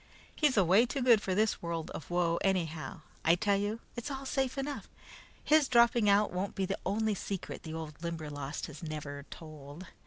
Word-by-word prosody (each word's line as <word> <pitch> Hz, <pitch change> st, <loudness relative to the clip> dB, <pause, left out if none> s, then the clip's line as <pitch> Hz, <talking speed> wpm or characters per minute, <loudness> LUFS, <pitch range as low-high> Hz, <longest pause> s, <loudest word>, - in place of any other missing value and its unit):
He's 295 Hz, -6 st, +2 dB
away 195 Hz, +5 st, +5 dB
too 270 Hz, +1 st, -2 dB
good 235 Hz, -4 st, +6 dB
for 190 Hz, -3 st, -1 dB
this 215 Hz, +1 st, +1 dB
world 170 Hz, -2 st, -3 dB
of 155 Hz, -, -8 dB
woe, 175 Hz, -1 st, +1 dB
anyhow. 170 Hz, -3 st, -1 dB, 0.2 s
I 165 Hz, -, +5 dB
tell 200 Hz, +2 st, +2 dB
you, 205 Hz, +3 st, -2 dB
it's 240 Hz, +4 st, -4 dB
all 270 Hz, -1 st, -5 dB
safe 265 Hz, 0 st, -1 dB
enough. 280 Hz, +1 st, -4 dB, 0.5 s
His 305 Hz, -2 st, +5 dB
dropping 235 Hz, -3 st, +5 dB
out 200 Hz, -1 st, +4 dB
won't 190 Hz, +2 st, -2 dB
be 195 Hz, -, 0 dB
the 195 Hz, +1 st, -3 dB
only 215 Hz, +2 st, +1 dB
secret 195 Hz, -1 st, -5 dB
the 160 Hz, -1 st, -6 dB
old 160 Hz, -2 st, -7 dB
Limberlost 150 Hz, -4 st, -4 dB
has 150 Hz, -2 st, -10 dB
never 150 Hz, -3 st, -6 dB
told. 155 Hz, +1 st, -10 dB
190 Hz, 185 wpm, -32 LUFS, 160-225 Hz, 0.5 s, good